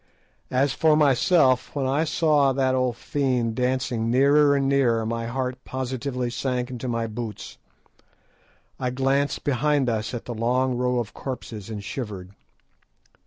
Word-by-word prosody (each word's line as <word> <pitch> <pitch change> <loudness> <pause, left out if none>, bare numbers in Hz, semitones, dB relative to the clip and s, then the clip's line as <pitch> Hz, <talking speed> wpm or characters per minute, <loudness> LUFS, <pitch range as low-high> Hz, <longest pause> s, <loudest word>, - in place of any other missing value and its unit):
As 135 +2 +1
for 160 -1 +3
myself, 140 -2 +3
when 140 -2 -1
I 140 +5 +1
saw 150 -4 +2
that 130 -1 +1
old 130 -2 0
fiend 125 -5 -1
dancing 125 -2 -1
nearer 140 +3 +4
and 135 -1 +1
nearer, 125 -5 +2
my 115 +1 -3
heart 130 +1 -3
positively 130 -1 -3
sank 125 0 -2
into 125 0 -5
my 115 -1 -1
boots. 110 -2 -7 1.2
I 125 - -1
glanced 135 +3 0
behind 140 0 +1
us 110 +1 -2
at 120 - -6
the 120 - -5
long 125 +3 0
rows 125 0 +1
of 110 - -8
corpses, 115 -6 -7
and 105 -2 -6
shivered. 100 -5 -6
130 Hz, 145 wpm, -24 LUFS, 120-135 Hz, 1.2 s, nearer